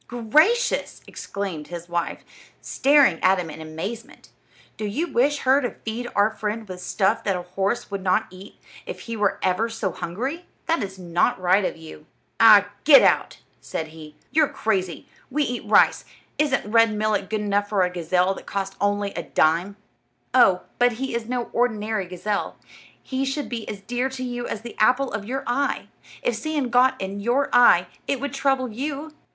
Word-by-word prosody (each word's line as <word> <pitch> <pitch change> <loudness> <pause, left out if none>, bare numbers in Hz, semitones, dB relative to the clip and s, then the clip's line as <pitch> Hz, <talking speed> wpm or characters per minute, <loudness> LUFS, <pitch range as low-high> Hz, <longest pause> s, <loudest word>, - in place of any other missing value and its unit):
"Gracious!" 305 - +2
exclaimed 190 -7 -6
his 175 0 -8
wife, 170 -1 -3 0.4
staring 275 - +3
at 190 +1 +4
him 170 -3 -4
in 160 - -9
amazement; 175 +9 -7 0.5
"do - - -7
you 215 +11 -1
wish 290 -1 +1
her 265 +2 +4
to 245 - -3
feed 230 +2 -4
our 205 +2 +3
friend 220 0 -4
with 180 -1 -8
stuff 190 0 0
that 195 - 0
a 180 - -4
horse 195 +5 -2
would 200 -1 -3
not 185 -1 +1
eat 185 +2 -13 0.3
if - - -7
he 230 - -6
were 205 -2 +1
ever 190 +5 +1
so 225 -4 -3
hungry? 260 - -5 0.2
This 265 - -1
is - - -16
not 180 +7 0
right 185 +2 +3
of 180 - -2
you." 160 -1 -12 0.3
"Ah, 210 -3 +7
get 285 -2 +8
out!" - - +2 0.2
said 160 -1 -5
he, 155 -1 -12 0.2
"you're 310 -1 +4
crazy. 190 - -2 0.2
We 295 +3 0
eat 245 -4 -4
rice; - - +5 0.4
isn't 285 -6 +1
red 230 0 +5
millet 210 -2 0
good 215 -1 -1
enough 205 0 0
for 200 -3 +2
a 180 - +1
gazelle 180 +2 +1
that - - -12
cost 195 -1 -3
only 205 0 0
a 170 - -3
dime?" 165 +6 +1 0.6
"Oh, 190 -8 +5 0.2
but 245 0 +4
he 265 +3 -4
is 235 -1 -3
no 245 -1 -3
ordinary 220 -4 0
gazelle. 190 +3 -3 0.5
He 265 0 -2
should 275 +2 -3
be 230 -3 -5
as 200 - -6
dear 245 +5 -2
to 260 -1 -6
you 245 -1 -4
as 215 - -5
the 235 0 -9
apple 255 +5 +3
of 205 -1 -4
your 265 +5 -3
eye. 275 +4 -1 0.3
If 245 - +1
sand 280 +1 -2
got 250 +2 +4
in 195 +1 -4
your 245 +7 +1
eye 210 -8 +6 0.2
it 275 - 0
would 285 +2 -4
trouble 270 -3 0
you." 290 +6 -5
215 Hz, 185 wpm, -23 LUFS, 190-255 Hz, 0.6 s, get